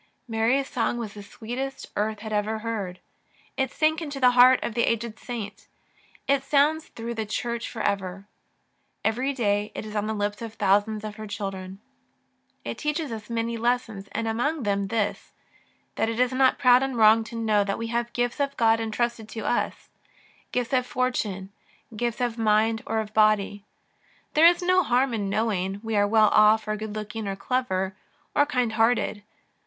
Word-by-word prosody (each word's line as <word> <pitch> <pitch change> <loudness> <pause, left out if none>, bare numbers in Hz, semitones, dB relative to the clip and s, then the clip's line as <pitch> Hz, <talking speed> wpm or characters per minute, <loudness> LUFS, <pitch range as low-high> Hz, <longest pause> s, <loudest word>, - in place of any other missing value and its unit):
Mary's 235 +4 +1
song 240 0 -1
was 220 -4 -5
the 205 - -9
sweetest 245 +6 -6
earth 210 0 -1
had 220 -1 -5
ever 210 +1 0
heard. 200 -6 -3 0.6
It 265 -1 0
sank 315 +1 +1
into 290 -3 -5
the 250 -1 +6
heart 250 +1 +7
of 235 - -3
the 235 - +1
aged 230 -1 -1
saint. 230 -5 -7 0.6
It 275 0 +3
sounds 295 +3 +2
through 230 +1 -6
the 220 -1 -3
Church 235 +2 -3
for - - -5
ever. 195 -1 -2 0.8
Every 250 +5 +1
day 210 -5 0
it - - -5
is 215 0 -8
on 210 0 0
the 220 - -2
lips 205 +1 -2
of 225 -1 -7
thousands 205 +2 +2
of 215 0 -6
her 215 0 -7
children. 195 -2 -6 0.8
It - - -5
teaches 300 -2 -2
us 220 -1 -7
many 230 0 -2
lessons, 230 -4 -1
and 230 - -2
among 255 +7 -1
them 200 -1 0
this 210 0 -2 0.3
— - - -40
that 225 - +1
it 230 +1 -3
is 250 0 +3
not 260 0 +3
proud 250 -2 +6
and 270 -2 -2
wrong 220 0 +6
to 230 - -9
know 215 -3 +2
that 200 0 -2
we 230 - -4
have 235 0 -1
gifts 245 +3 -1
of 280 -1 -1
God 225 -1 +4
entrusted 225 0 -2
to 225 - -6
us, - - -1 0.6
gifts 250 +1 -2
of 255 -1 +2
fortune, 210 -7 -2 0.4
gifts 240 +2 -2
of 240 -1 -1
body 220 +1 +3
or 220 - 0
of 215 0 -9
mind. 215 -1 +3 0.7
There 320 +2 +7
is 350 +1 +3
no 365 +1 +4
harm 255 -4 +1
in 205 -3 -2
knowing 195 -2 -1
we 225 -1 -2
are 205 0 +3
well 215 0 +5
off, 215 +1 +5
or 215 - 0
good 215 0 -6
looking, 215 0 -5
or 195 - -2
clever, 195 -4 -1 0.4
or 290 - +4
kind 250 -4 0
hearted. 225 -1 +1
225 Hz, 185 wpm, -25 LUFS, 210-250 Hz, 0.8 s, heart